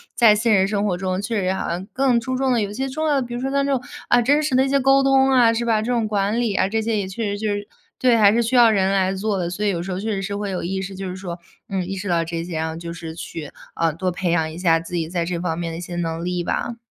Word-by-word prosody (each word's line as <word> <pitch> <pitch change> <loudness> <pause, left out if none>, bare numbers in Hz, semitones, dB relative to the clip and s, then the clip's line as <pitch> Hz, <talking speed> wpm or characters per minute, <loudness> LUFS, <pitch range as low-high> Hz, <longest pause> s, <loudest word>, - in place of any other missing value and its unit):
在 230 -3 +6
现 210 -2 +3
实 190 - +2
生 205 0 0
活 185 - +1
中 185 +1 -2
确 215 0 -1
实 185 0 0
好 190 - -3
像 175 +3 -3
更 260 -2 +2
注 255 +2 -2
重 265 -1 +1
的 235 - +2
有 205 - -2
一 205 - -7
些 265 +4 -2
重 310 +4 -3
要 290 - +3
的， 275 - +2
比 240 - -7
如 240 - -4
说 270 +1 -2
像 280 0 +1
这 280 - 0
种， 255 - 0 0.3
啊， 245 - +4
真 285 +5 +3
实 295 -4 0
的 260 - +5
一 - - -2
些 275 0 +3
沟 270 +1 +4
通 270 0 +4
啊， 240 -3 +5
是 235 +1 -1
吧？ 225 -2 +2
这 230 +3 -2
种 230 -3 +1
管 205 +2 0
理 235 -4 0
啊， 190 - +2
这 220 +2 0
些 220 -1 0
也 195 - -2
确 190 +5 -5
实 205 -1 -2
就 215 - -2
是 205 0 -5 0.3
对， 250 -2 +4
还 205 -2 +6
是 235 - +3
需 235 +3 -1
要 240 -2 +7
人 195 -3 +2
来 190 -1 +2
做 200 +1 -1
的。 175 -1 -2
所 205 +4 -3
以 - - +3
有 175 -4 -1
时 185 +2 -5
候 180 - -3
确 220 +2 -2
实 195 -1 -2
是 200 +1 -3
会 205 -1 -3
有 185 - -3
意 190 +2 -2
识， 195 0 -6
就 190 0 -5
是 180 - -5
说， 180 -2 -6 0.3
嗯， 190 -2 -2
意 195 - -4
识 195 0 -5
到 170 -1 +2
这 165 0 -4
些， 170 -2 -5
然 160 0 -1
后 160 - -5
就 170 0 -6
是 165 -1 -7
去， 165 -2 -7 0.2
呃， 165 -1 +1
多 180 +3 -2
培 180 0 -1
养 160 -2 +1
一 160 - -9
下 170 -2 +3
自 165 +2 -7
己 165 -2 -1
在 170 0 -2
这 170 0 -3
方 165 -2 -2
面 170 -1 -3
的 165 - -6
一 - - -6
些 175 0 -6
能 165 -1 -3
力 180 -1 -1
吧。 235 +6 -2
200 Hz, 360 characters per minute, -22 LUFS, 175-235 Hz, 0.3 s, 要